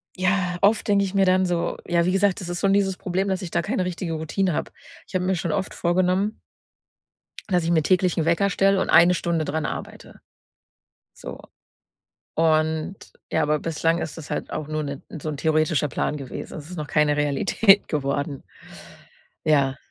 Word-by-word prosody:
ja, 185 -1 0
oft 205 +3 +3
denke 200 -1 +3
ich 190 - -5
mir 195 -1 +3
dann 185 0 +3
so 175 -1 -1
ja 170 -1 +2
wie 185 - +2
gesagt, 195 0 +1
das 175 - -6
ist 175 - -3
schon 195 0 +3
dieses 195 -2 +1
Problem, 190 +2 -2
dass 190 -1 -1
ich 175 - -6
da - - +1
keine 195 -2 -1
richtige 175 -2 -3
Routine 160 +3 -1
habe. - - -3 0.4
Ich - - -17
habe 180 - 0
mir 190 0 +1
schon 170 -1 -2
oft 185 - -2
vorgenommen 185 +4 0 1.1
dass 180 -2 +2
ich 165 - 0
mir 160 -2 +4
täglich 180 0 +2
'n 160 - +1
Wecker 170 +4 +2
stelle 195 0 +2
und - - -2
1 170 +2 +7
Stunde 170 -2 -1
dran 155 0 -2
arbeite. - - -7 1.0
So. - - -9 1.0
Und 160 +2 +1 0.3
ja, 160 - +2
aber 150 0 +1
bislang 165 +1 0
ist 160 0 -5
das 155 - -9
halt - - -4
auch 155 -1 -4
nur 155 0 -2
'nen 140 -1 -5 0.2
so 155 - -3
'n 145 - -4
theoretischer 155 -1 +1
Plan 150 +2 -2
gewesen. 135 -3 -7
Es 155 +1 -10
ist 180 - -7
noch 150 -1 -4
keine 150 -1 +2
Realität 195 +8 +3
geworden. 140 -1 -2 1.0
Ja. 140 -3 +2
170 Hz, 190 wpm, -23 LUFS, 155-185 Hz, 1.1 s, 1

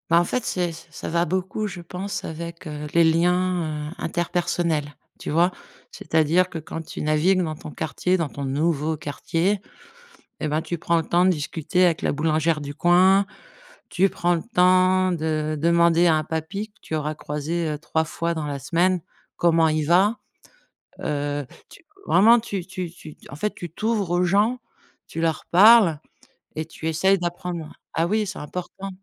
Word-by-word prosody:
Bah, 170 0 +6
en 175 - +1
fait, 250 +6 -2
c'est 180 -5 -1 0.2
ça 165 - -7
va 170 +1 +1
beaucoup, 185 +5 -2
je 180 -3 -7
pense, 185 +4 -5
avec, 170 +2 -7
heu, 150 0 -6
les 170 - +5
liens, 165 -2 +1
heu, - - -8
interpersonnels, 170 -3 -1 0.3
tu - - -6
vois? 170 +4 +3 0.4
C'est-à-dire 160 +4 +1
que 170 - -6
quand 160 +1 -6
tu - - -7
navigues 155 +5 +2
dans 160 -3 -2
ton 150 - -10
quartier, 180 +5 -1
dans 165 -3 -1
ton 140 - -7
nouveau 155 +2 0
quartier 165 +6 -1 0.8
et 155 - -1
bah, 155 +2 0
tu 170 +1 -4
prends 170 +2 +1
le 165 - 0
temps 175 +3 +2
de - - +5
discuter 165 +2 0
avec 170 -3 +2
la - - +1
boulangère 155 +1 +1
du 145 0 -6
coin, 185 +4 +4 0.6
tu 190 +2 +3
prends 175 0 +1
le 165 - -4
temps 185 0 +4
de 155 -2 -1
demander 170 +1 +4
à 160 - +4
un 155 - -1
papy 165 +7 -4
que 210 - -34
tu - - -6
auras 155 0 -2
croisé, 155 +3 -3
heu, 150 -1 -3
3 160 0 -1
fois 170 +2 -2
dans 155 -2 -3
la 145 -1 -3
semaine, 175 +6 +1 0.4
comment 165 -1 +3
il 155 -1 0
va. 190 +8 +3 0.8
Heu, 145 -1 -2 0.2
tu, - - -16 0.2
vraiment, 225 +7 +6
tu 200 -6 -5
tu 185 -2 -5
tu, 160 -3 -13
en 140 - -8
fait, 210 +8 -2
tu 175 - -7
t'ouvres 210 +1 -1
aux 175 +1 +2
gens, 205 +7 +2 0.5
tu 165 - -5
leur 165 -1 -1
parles 195 -4 +7 0.6
et 155 - -3
tu 160 0 -7
essaies 190 +5 +3
d'apprendre 175 -2 -5 0.2
ah 165 +1 +2
oui, 215 +2 0
c'est - - -6
important. 180 +5 -6
170 Hz, 180 wpm, -23 LUFS, 155-185 Hz, 0.8 s, parles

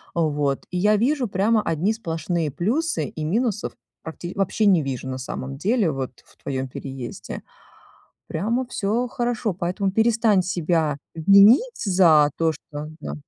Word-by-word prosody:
Вот. 145 -4 0
И 180 - -2
я 210 +4 +4
вижу 255 +4 +1
прямо 210 +3 +2
одни 175 +5 0
сплошные 165 -5 -2
плюсы. 265 - 0
И 155 - -6
минусов 215 +5 -1 0.3
практи 175 +2 -7
вообще 200 +2 0
не 185 -5 +5
вижу, 130 -1 -4
на 130 0 -4
самом 135 +1 -6
деле, 205 - +1
вот, 135 -2 -4
в - - -24
твоём 130 -1 -3
переезде. 130 -1 -7 0.8
Прямо 230 +10 -1
всё 230 +2 -1
хорошо. 240 -4 -2
Поэтому 185 +2 -2
перестань 220 -1 +3
себя 165 -4 0 0.2
винить 200 - +6
за 170 -7 +5
то, 165 -1 +2
что 150 -1 -8
да. 70 - -6
180 Hz, 145 wpm, -23 LUFS, 155-220 Hz, 0.8 s, винить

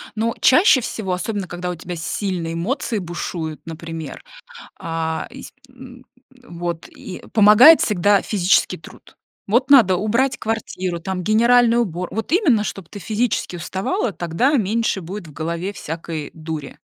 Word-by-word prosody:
Ну, 225 +1 0
чаще 270 -1 +5
всего, 200 -5 -3
особенно 190 +1 -3
когда 175 +1 -5
у 180 - -3
тебя 175 +1 -7
сильные 170 0 -3
эмоции 210 - -2
бушуют, 170 -3 -5
например, 165 0 -7 0.6
а, 165 -1 -3
ис 270 - -11 0.2
м, 255 0 -14 0.3
м, 245 -10 -13
вот, 170 -1 -4
и 185 - -10
помогает 220 +9 +8
всегда 205 0 +2
физический 190 -3 +2
труд. - - -16 0.3
Вот 240 +6 +2
надо 215 -10 +7
убрать 235 +7 0
квартиру, 185 -6 -3
там 180 0 -4
генеральный 235 +2 +4
убор 180 -6 -2
вот 220 +2 -4
именно, 295 - +3
чтоб 195 -4 -6
ты 205 - -9
физически 215 -1 -1
уставала, 190 +5 -2
тогда 175 - 0
меньше 225 -3 0
будет 185 +2 -7
в 155 - -13
голове 170 +6 -4
всякой 160 -3 -6
дури, 155 -3 -7
190 Hz, 145 wpm, -20 LUFS, 170-230 Hz, 0.6 s, помогает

